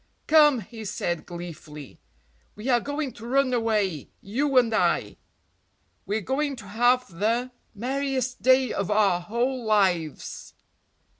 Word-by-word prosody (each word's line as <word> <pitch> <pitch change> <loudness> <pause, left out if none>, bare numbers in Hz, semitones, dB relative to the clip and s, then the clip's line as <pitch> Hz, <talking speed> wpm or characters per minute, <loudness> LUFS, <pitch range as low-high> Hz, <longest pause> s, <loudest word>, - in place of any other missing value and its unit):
"Come," 295 -5 +5
he 220 +3 -10
said 190 -5 -3
gleefully, 160 -5 -9 0.6
"we 215 +5 -5
are 245 -2 +4
going 285 +2 -3
to 230 +1 -10
run 265 0 +2
away, 210 - 0
you 265 +7 -1
and 235 -3 +4
I. - - +1 0.9
We're 210 +2 -1
going 275 +6 -1
to 230 -4 -11
have 235 -3 +1
the 235 +4 0 0.2
merriest 260 +2 -2
day 260 -1 +4
of 200 - -2
our 205 -4 +3
whole 240 +6 -2
lives!" 190 -8 0
230 Hz, 130 wpm, -25 LUFS, 200-260 Hz, 0.9 s, Come